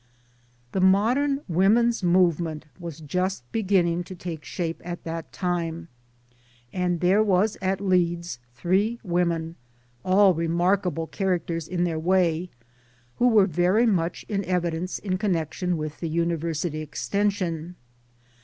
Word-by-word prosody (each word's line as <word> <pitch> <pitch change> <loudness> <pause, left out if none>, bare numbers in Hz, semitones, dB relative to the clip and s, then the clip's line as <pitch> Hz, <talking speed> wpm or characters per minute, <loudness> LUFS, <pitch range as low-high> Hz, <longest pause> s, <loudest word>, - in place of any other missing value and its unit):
The 190 - -1
modern 245 +10 +3
Women's 215 +7 +3
Movement 170 -3 +2
was 165 -3 -7
just 180 0 -2
begin 195 -5 +2
ning 170 +1 -1
to 185 - -9
take 170 -3 -6
shape 165 -2 -4
at 175 0 -6
that 165 0 -5
time. 170 -2 -3 0.8
And 180 -2 -1
there 190 +4 +4
was 205 +1 +2
at 190 0 0
Leeds 175 -6 0 0.2
three 195 - +1
women 170 -2 -1 0.5
all 190 +1 +5
remarkable 170 0 0
characters 170 -3 -2
in 175 0 -1
their 165 -2 -1
way 175 0 +1 0.7
who 245 - +4
were 215 -5 +6
very 185 +6 +2
much 175 -6 0
in 200 -2 -1
evidence 175 0 -1
in 185 -2 -3
con 205 -3 +1
nection 170 +2 -2
with 155 -1 -5
the 165 - -3
University 165 -1 -1
Extension. 180 +1 -2
175 Hz, 130 wpm, -25 LUFS, 165-190 Hz, 0.8 s, were